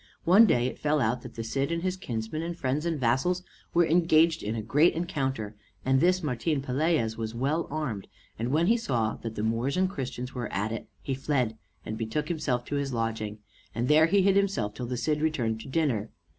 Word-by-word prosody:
One 200 +6 +7
day 120 -8 +3
it 130 - -3
fell 150 0 +1
out 120 0 +1
that - - -10
the 115 - -4
Cid 135 +7 -1
and 170 0 -1
his 185 0 0
kinsmen 120 - -4
and 170 +1 -4
friends 145 +4 -1
and 165 -3 -1
vassals 135 +10 +1 0.3
were 175 0 +4
engaged 165 -1 +4
in 110 +2 -3
a 110 - -2
great 145 +10 +4
encounter, 135 - -2 0.3
and 130 0 +4
this 185 +1 +3
Martin 145 +2 0
Pelaez 135 -3 0
was 110 0 -4
well 145 +7 0
armed; 135 -10 -3 0.3
and 115 +2 -1
when 155 +5 +2
he 230 +5 +4
saw 120 - 0
that 115 -1 -6
the 105 - -2
Moors 115 +7 0
and 185 0 +2
Christians 130 -4 -5
were 125 -2 -4
at 105 +3 -1
it, 115 - -5 0.2
he 135 - -2
fled 130 -4 0 0.3
and 110 0 -5
betook 130 +8 -2
himself 145 -7 -1
to 145 - -2
his 140 -1 -2
lodging, 110 -3 -3 0.3
and 120 +2 0
there 155 +2 +6
hid 195 +1 +4
himself 195 - +1
till 125 +1 -5
the 125 0 -3
Cid 150 +4 0
returned 120 -8 0
to - - -10
dinner. 130 -8 0
135 Hz, 210 wpm, -28 LUFS, 115-165 Hz, 0.3 s, One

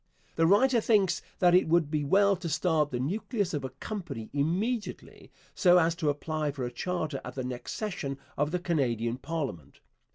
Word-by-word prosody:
The 165 0 +3
writer 235 +6 +4
thinks 200 -5 +2 0.2
that 175 -1 +4
it 180 -1 +5
would 160 -2 +2
be 150 -2 0
well 200 +7 +4
to 170 -1 -5
start 155 -1 +1
the 125 - -3
nucleus 200 - -2
of 145 -3 -2
a 130 - -3
company 150 - -7
immediately 190 - -2 0.2
so 180 -1 +5
as 165 -1 +3
to 155 -4 0
apply 155 +1 -2
for 135 -3 -4
a 120 - -4
charter 155 0 -3
at - - -8
the 130 - -3
next 125 -1 -5
session 180 -10 -4 0.2
of 145 +1 0
the 180 - 0
Canadian 125 -9 -1
parliament. 140 - -5
160 Hz, 185 wpm, -29 LUFS, 140-185 Hz, 0.2 s, it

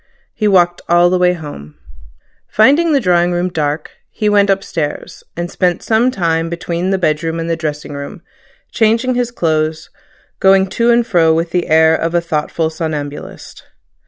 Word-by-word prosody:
He 215 -2 -1
walked 175 -3 +2
all 175 +1 +4
the 185 - +1
way 180 0 +3
home. 145 - -9 0.7
Finding 290 +10 +3
the 285 - +3
drawing 175 -5 +2
room 175 +1 -1
dark, 150 -2 -3 0.2
he 210 - -1
went 200 -1 +3
upstairs, 175 -6 -3
and 175 0 -4
spent 180 -1 0
some 230 +3 +2
time 165 -7 -1
between 170 +1 -3
the 195 - +1
bedroom 165 -1 -1
and 165 - -4
the 165 - 0
dressing 150 -2 -5
room, 140 +5 -8 0.5
changing 230 +3 +1
his 245 -1 -1
clothes, 160 -6 -2 0.5
going 190 0 +4
to 235 +5 0
and 235 0 +3
fro 165 -6 +3
with 165 +1 -2
the 180 -1 -1
air 160 +1 +4
of 165 +1 -2
a - - +4
thoughtful 160 0 -2
somnambulist. 150 -3 -6
175 Hz, 165 wpm, -15 LUFS, 160-195 Hz, 0.7 s, all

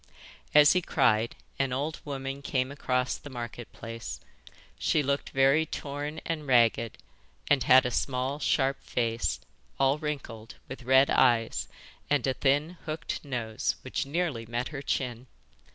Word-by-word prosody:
As 150 -1 +8
he 180 - +2
cried 110 -7 +2 0.2
an 135 -1 +1
old 145 +5 -2
woman 135 -1 -5
came 130 -2 -1
across 125 -3 0
the 145 - -10
Market 120 -2 -7
Place. 115 0 -7 0.6
She 150 - +2
looked 140 +1 -1
very 135 +4 +4
torn 145 0 -5
and 155 -3 -3
ragged, 115 -3 +3 0.5
and 145 -2 +5
had 130 0 +7
a 125 - 0
small 130 +3 -1
sharp 135 -2 +1
face, 115 -1 -1 0.4
all 135 +2 +3
wrinkled, 125 -7 -5
with 135 - -8
red 130 +2 +5
eyes, 120 -3 +3 0.4
and 145 -4 +2
a 135 - +1
thin 145 +6 +1
hooked 155 +1 -4
nose 120 -6 -2
which - - -3
nearly 145 -7 -2
met 120 +2 -2
her 140 -3 -6
chin. 125 -3 -2
135 Hz, 145 wpm, -28 LUFS, 120-145 Hz, 0.6 s, As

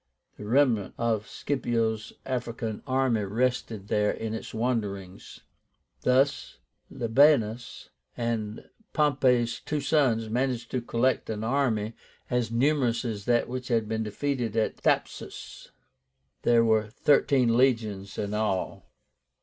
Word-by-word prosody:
The 105 - -9
remnant 120 -4 +2
of 115 -2 0
Scipio's 115 -5 -1
African 115 -4 -3
army 130 -4 +1
rested 110 -1 -1
there 105 -1 +2
in 110 -1 -3
its 110 - -6
wanderings. 105 -5 -3 0.6
Thus 135 - +1 0.3
Labiénus 120 -2 +2 0.3
and 115 -3 -3 0.3
Pompey's 125 -6 +2
two 150 - -3
sons 135 -6 +2
managed 120 +1 -1
to 125 - -1
collect 120 +2 0
an 110 -1 -3
army 115 -4 0 0.4
as 125 -2 +1
numerous 125 -1 +1
as 105 -4 -4
that 120 -1 +2
which 125 0 -5
had 115 -3 +1
been 110 0 -2
defeated 115 +1 -2
at 110 - +1
Thapsus. - - -3 0.7
There 115 -1 +4
were 110 -1 +2
thirteen 130 -1 +3
legions 110 -6 +1
in 105 0 -3
all. 105 -3 -2
115 Hz, 115 wpm, -27 LUFS, 110-130 Hz, 0.7 s, There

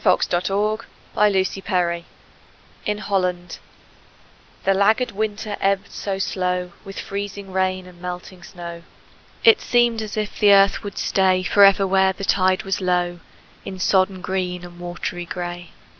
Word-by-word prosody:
FLOOD - - +4
TIDE 175 +2 0
OF 210 +2 0 0.3
FLOWERS 190 -3 +1 0.8
IN 210 0 0
HOLLAND 180 -4 -2 1.0
The 195 - +3
laggard 215 +6 +2
winter 210 0 -3
ebbed 195 0 0
so 195 -1 -3
slow 180 -2 -1
With 195 -1 -8
freezing 200 0 -5
rain 185 0 0
and 180 -1 -15
melting 180 0 -7
snow, 170 -1 -9 0.6
It 450 -2 +6
seemed 240 -2 +2
as 215 0 -6
if 210 -1 -3
the 205 -1 +6
earth 195 0 +5
would 205 -1 -7
stay 185 -1 +2
Forever 195 +2 +5
where 190 0 +3
the 195 - -8
tide 185 -1 +2
was 195 0 -2
low, 175 -1 0 0.4
In 190 - -7
sodden 185 0 +2
green 180 -1 -3
and 175 0 -13
watery 175 0 -5
gray. 175 0 -6
190 Hz, 145 wpm, -22 LUFS, 180-200 Hz, 1.0 s, It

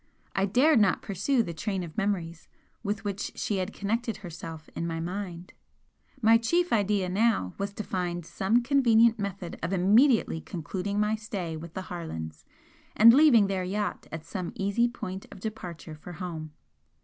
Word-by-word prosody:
I 195 +1 +2
dared 260 +6 +4
not 200 -3 +2
pursue 230 +6 +1
the 170 - -5
train 190 +4 -2
of 160 -3 -9
memories 175 -6 -2 0.3
with 205 0 -3
which 200 -1 -3
she 205 - -1
had 185 +2 -2
connected 225 +3 -2
herself 165 -3 -8
in 170 - -2
my 165 -1 -3
mind. 180 0 -5 0.7
My 225 +1 +6
chief 345 +9 +1
idea 205 -3 +2
now 190 - +1
was 200 0 -2
to 215 - -5
find 175 -3 -3
some 195 +7 +1
convenient 235 -4 +4
method 195 -3 -5
of 175 +3 -2
immediately 205 - +4
concluding 190 +4 -4
my 210 +1 +2
stay 200 -6 -5
with 160 +1 -9
the 190 - -3
Harlands 80 - -6 0.5
and 230 +2 +9
leaving 265 -7 +6
their 195 -2 -1
yacht 205 +3 -3
at 160 0 -6
some 180 0 -5
easy 200 +5 +1
point 190 -5 -6
of 200 - -10
departure 180 -6 -6
for 155 +3 -10
home. 160 -3 -6
195 Hz, 165 wpm, -28 LUFS, 175-220 Hz, 0.7 s, and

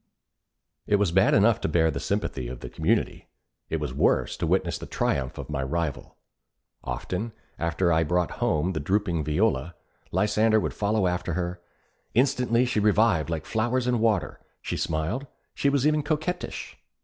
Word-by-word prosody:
It 105 - +4
was 100 -4 +2
bad 95 +3 +4
enough 110 +2 +4
to - - 0
bear 80 0 +3
the 70 - -4
sympathy 70 - -2
of - - -7
the - - -7
community; - - 0 0.4
it 80 - -1
was 75 -4 -3
worse - - +2
to - - -1
witness - - +1
the - - -8
triumph 65 -2 -1
of - - -6
my 75 -3 -2
rival. 75 +1 -3 0.7
Often, 90 - -4 0.3
after 85 +1 +1
I 80 - +3
had 80 - 0
brought 90 0 +1
home 80 +5 +1
the 80 - -2
drooping 85 0 0
Viola, 80 -1 0 0.4
Lysander 110 +1 +3
would - - -2
follow 105 -1 +1
after 90 0 -1
her. 90 +1 -3 0.5
Instantly 125 -1 +3
she 125 -3 0
revived 105 -6 +3
like 80 -2 -3
flowers 120 +3 0
in 125 -1 +1
water. 110 -6 +1 0.2
She - - -4
smiled, 85 - -2 0.3
she 140 - +1
was 140 -1 +1
even 150 0 +3
coquettish. 155 +4 -3
95 Hz, 170 wpm, -26 LUFS, 80-115 Hz, 0.7 s, It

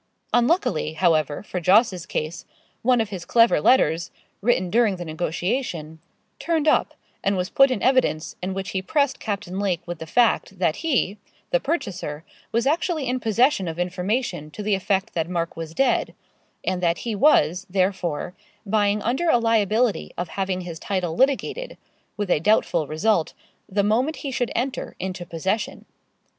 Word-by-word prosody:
Unluckily, 240 - +2
however, 155 -3 +1
for 185 - -4
Jos.'s 185 0 +3
case, 155 +2 -4 0.4
one 250 0 +3
of 220 -2 0
his 190 -4 -6
clever 230 -7 +4
letters, 170 - +3 0.3
written 190 -5 +1
during 225 -3 +3
the 175 -1 -6
negotiation, 165 - -3 0.4
turned 320 -2 0
up, - - +3 0.3
and 195 0 +1
was 185 +2 -2
put 275 0 +6
in 255 -5 -2
evidence, 255 -12 +2
in 185 +1 -3
which 195 -1 -4
he 190 - -1
pressed 280 +7 0
Captain 200 -3 -4
Lake 190 -4 -1
with 175 -1 -6
the 160 - -7
fact, 225 -1 +2
that 175 -3 +1
he, 250 - 0 0.3
the - - +3
purchaser, 185 - -3 0.3
was 230 +2 +1
actually 315 0 0
in 255 +1 -1
possession 225 -2 +2
of 165 0 -4
information 180 - -2
to 210 - -7
the 210 0 +1
effect 195 +2 0
that 165 0 -1
Mark 170 -2 -2
was 165 0 -7
dead, 270 -2 +1 0.5
and 180 -1 -1
that 170 +3 0
he 230 - -1
was, 200 - +3
therefore, 185 -4 -1 0.3
buying 205 0 +1
under 265 +9 0
a 245 - +5
liability 225 0 +1
of 175 -1 -3
having 190 -1 -2
his 170 -2 -7
title 185 -5 -2
litigated, 280 - 0 0.4
with 205 -3 -2
a - - +4
doubtful 170 -4 +2
result, 165 +3 +1 0.3
the 200 +1 +1
moment 245 +9 +1
he 275 - -2
should 245 -1 -1
enter 255 +3 -2
into 185 -1 -5
possession. 190 +6 -2
195 Hz, 165 wpm, -23 LUFS, 175-240 Hz, 0.5 s, put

